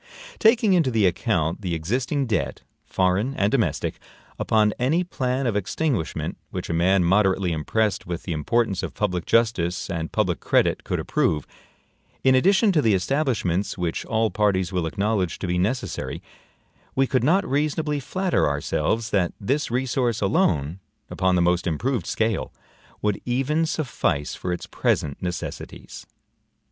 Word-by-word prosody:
Taking 220 -3 +4
into 165 -7 +3
the 110 -4 +2
account 85 -3 0
the 90 -4 -2
existing 125 - -1
debt, 110 -8 -2 0.2
foreign 95 +8 +1
and 100 +1 +1
domestic, 110 - 0 0.4
upon 105 -1 +2
any 150 +9 +2
plan 130 -6 -2
of 115 -4 0
extinguishment 105 - -2
which - - -5
a - - -1
man 90 +3 +3
moderately 95 0 +2
impressed 100 +6 -1
with 85 -2 -4
the 90 - -5
importance 95 +6 0
of - - -5
public 90 -4 -1
justice 100 -9 +1
and 80 -2 -3
public 90 -6 0
credit - - +1
could - - -2
approve, 75 -2 0 0.8
in 130 - +5
addition 195 - +4
to 160 -5 +3
the 110 -6 +3
establishments 100 - 0
which 85 -3 -2
all 110 0 +1
parties 95 -3 +1
will 90 -3 0
acknowledge 100 0 -1
to - - -5
be 90 0 0
necessary, 110 +8 -2 0.8
we 135 - +3
could 130 -2 0
not 185 +8 +3
reasonably 150 +1 0
flatter 175 - 0
ourselves, 110 +10 -1
that 90 -4 +1
this 140 +9 -1
resource 125 -1 0
alone, 85 -4 +1 0.3
upon 95 0 +1
the 90 - +3
most 90 0 +1
improved 100 - -1
scale, 110 -2 -1 0.5
would 105 -2 0
even 135 +6 0
suffice 110 - -1
for 90 - -4
its 90 - -3
present 70 -2 -1
necessities. 90 0 -6
105 Hz, 150 wpm, -24 LUFS, 90-130 Hz, 0.8 s, in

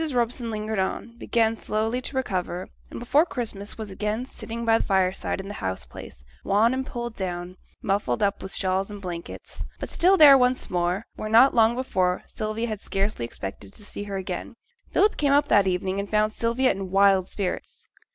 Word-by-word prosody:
Robson 240 0 0
lingered 215 -1 -3
on, 225 +4 -3
began 225 -2 +1
slowly 225 +4 -1
to 265 - -5
recover, 185 -6 -2 0.2
and - - -7
before 255 +6 +3
Christmas 220 - -4
was 215 -3 -6
again 210 +5 -2
sitting 235 -2 -6
by 225 0 +4
the - - -1
fireside 190 -1 0
in 190 - -6
the 205 - -6
house 95 - -4
place, - - -11 0.2
wan 220 +5 +3
and 260 0 -1
pulled 240 -1 -5
down, 180 -1 -4 0.3
muffled 195 -10 0
up 200 0 0
with 190 - -6
shawls 190 +1 0
and 205 -1 -7
blankets, 175 -3 -7 0.2
but - - -5
still 375 +3 +4
there 285 -4 +9
once 250 +1 +1
more, 180 +3 0
where 215 - -4
not 235 +5 +6
long 230 0 +4
before 185 -8 0
Sylvia 215 +2 -3
had 215 -3 -4
scarcely 195 - -2
expected 100 -3 -7
to 210 - -10
see 205 - -7
her 200 -1 -4
again. 185 +4 -5 0.4
Philip 420 - +3
came 285 -2 +2
up 290 +1 +4
that 200 -2 +5
evening 190 +1 -1
and 200 0 -4
found 215 0 +2
Sylvia 235 +4 +1
in 195 -1 -4
wild 195 -1 +4
spirits. 190 -3 -5
210 Hz, 190 wpm, -25 LUFS, 190-235 Hz, 0.4 s, there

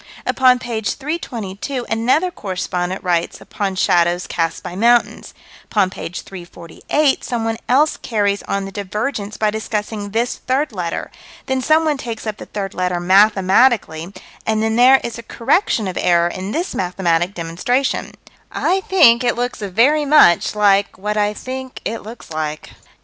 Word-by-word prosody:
Upon 255 -1 +4
page 230 -3 -3
322, 255 - -5
another 255 +11 +1
correspondent 185 - -4
writes 175 -2 -1
upon 195 -2 -4
shadows 175 -1 +2
cast 165 -1 -2
by 175 - -7
mountains; 235 +4 +2 0.3
upon 195 -3 +1
page 175 -1 -6
348 185 - -2
someone 225 -2 -2
else 290 +5 +3
carries 205 -3 -1
on 200 0 -1
the 195 - -7
divergence 210 +2 -4
by 215 -1 +1
discussing 210 -1 -4
this 230 +4 -1
third 270 +3 -1
letter: 180 -5 -4 0.3
then 265 -1 -1
someone 310 +1 +2
takes 230 -4 -6
up 215 -1 -4
the - - -10
third 195 -2 -5
letter 180 -1 -1
mathematically; 195 -1 +3 0.3
and 220 0 0
then 220 0 0
there 255 +3 +6
is 235 0 -5
a - - -6
correction 230 - 0
of 185 - -3
error 170 -1 +3
in 185 +3 -5
this 345 - -2
mathematic 180 0 0
demonstration 180 +11 -1 0.4
I 385 +1 0
think 255 -11 +6
it 240 - +1
looks 245 +1 -3
very 235 +10 +2
much 275 - +5
like 200 -1 +2
what 210 +2 -3
I 210 0 0
think 260 +2 -7
it 225 +2 -3
looks 220 -4 -11
like. 155 -1 -4
210 Hz, 150 wpm, -19 LUFS, 185-250 Hz, 0.4 s, there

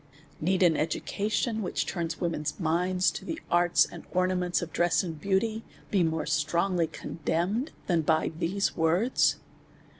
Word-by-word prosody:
Need 185 +3 +2
an 170 -3 +5
education, 210 - -1
which 185 - -1
turns 165 -2 -3
women's 165 -2 -2
minds 180 +2 +1
to - - -7
the 325 - -4
arts 175 0 +4
and - - -10
ornaments 180 -1 +1
of 165 - -8
dress 175 +2 +2
and 160 -4 -6
beauty, 215 +4 0 0.3
be 195 - +3
more 160 -2 0
strongly 170 +3 +1
condemned, 175 - -2
than 170 -3 +2
by 160 0 +1
these 195 +4 0
words? 175 +10 +2
175 Hz, 145 wpm, -28 LUFS, 165-195 Hz, 0.3 s, an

